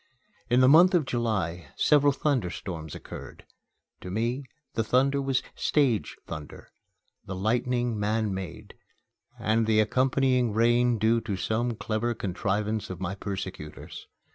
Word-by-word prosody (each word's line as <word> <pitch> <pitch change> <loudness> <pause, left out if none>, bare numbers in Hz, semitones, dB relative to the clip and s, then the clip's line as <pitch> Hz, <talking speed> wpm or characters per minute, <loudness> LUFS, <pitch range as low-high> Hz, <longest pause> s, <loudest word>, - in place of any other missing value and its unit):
In 125 +1 +4
the 130 - +6
month 175 +7 +7
of 165 -5 +2
July 100 - -2
several 145 -1 +4
thunder 135 -8 0
storms 80 -4 -6
occurred. - - -10 0.5
To 90 - -8
me 120 +7 -1 0.3
the 115 - 0
thunder 135 +5 +2
was 135 -2 0
"stage" 130 -8 +1
thunder, 75 -3 -9 0.6
the 95 - -4
lightning 120 +3 0
man 105 0 0
made, 95 -2 -7 0.6
and 110 +1 +1
the 110 -1 +3
accompanying 125 +1 +2
rain 120 +2 +3
due 110 +2 +2
to 105 -4 -3
some 115 +4 -1
clever 115 +2 -2
contrivance 105 +3 -2
of 90 -2 -6
my 95 0 -3
persecutors. 95 -6 -7
115 Hz, 135 wpm, -27 LUFS, 100-125 Hz, 0.6 s, month